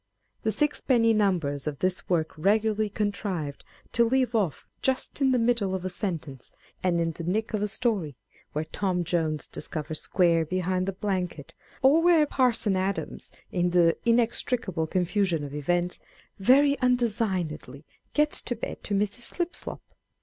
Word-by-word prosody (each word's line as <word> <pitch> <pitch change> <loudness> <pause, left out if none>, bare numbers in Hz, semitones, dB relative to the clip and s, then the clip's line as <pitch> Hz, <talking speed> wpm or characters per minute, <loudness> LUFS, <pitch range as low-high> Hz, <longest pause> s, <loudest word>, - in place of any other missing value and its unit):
The 220 - 0
sixpenny 240 -2 +2
numbers 170 -10 0
of 145 -2 -2
this 185 +3 -2
work 160 -3 +1
regularly 215 +5 +2
contrived 200 -8 -3 0.3
to 235 - +4
leave 250 +1 +1
off 190 - 0 0.2
just 265 +2 0
in 270 - +4
the 255 - +3
middle 230 -5 +1
of 185 -1 -4
a 185 - -2
sentence, 160 - -5 0.3
and 175 -2 +2
in 165 0 +1
the 165 +1 -8
nick 215 +7 -1
of 210 - 0
a 210 - +1
story, 200 - -1 0.4
where 155 +1 -2
Tom 180 +1 -1
Jones 160 -3 -1
discovers 155 0 -4
Square 170 -3 +2
behind 185 +2 -1
the - - +1
blanket; 185 -6 -3 0.3
or 285 +5 +6
where 335 -3 +5
Parson 245 -8 +2
Adams, 190 +1 -3 0.2
in 180 -1 +1
the 170 -1 +4
inextricable 230 -6 +1
confusion 180 -2 0
of 145 -1 -6
events, 175 +5 -1 0.4
very 280 +7 +5
undesiguedly 200 - -1 0.3
gets 300 0 +2
to 245 - -2
bed 220 - -6
to 205 - -1
Mrs. 205 +3 0
Slip 345 +8 -3
slop. - - -7
190 Hz, 155 wpm, -27 LUFS, 170-230 Hz, 0.4 s, or